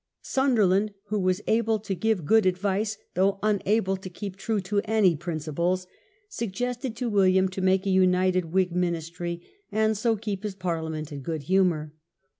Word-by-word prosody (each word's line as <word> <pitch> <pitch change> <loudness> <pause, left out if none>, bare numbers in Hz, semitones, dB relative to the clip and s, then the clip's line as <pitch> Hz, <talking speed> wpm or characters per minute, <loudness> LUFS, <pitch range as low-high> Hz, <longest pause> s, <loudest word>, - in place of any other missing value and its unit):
Sunderland, 215 -6 +2
who 210 0 0
was 185 +1 0
able 225 0 +2
to 205 -1 -4
give 215 -3 0
good 220 +4 +4
advice, 200 +3 0 0.2
though 195 +2 +2
unable 210 -1 +1
to 190 0 -8
keep 190 +1 -7
true 215 +2 -1
to 200 +2 0
any 210 -5 +3
principles, 170 +3 -2 0.4
suggested 245 - -3
to 250 +1 -3
William 190 -3 +4
to 190 +1 -5
make 190 +1 +2
a 195 - +1
united 185 -1 +3
Whig 180 +2 +1
ministry, 170 0 -2 0.3
and 220 +1 +2
so 225 +2 +1
keep 205 -2 -4
his 210 -2 -4
Parliament 160 -4 -3
in 140 -1 -6
good 155 +1 -4
humour. 170 -4 +1
190 Hz, 160 wpm, -26 LUFS, 180-215 Hz, 0.4 s, good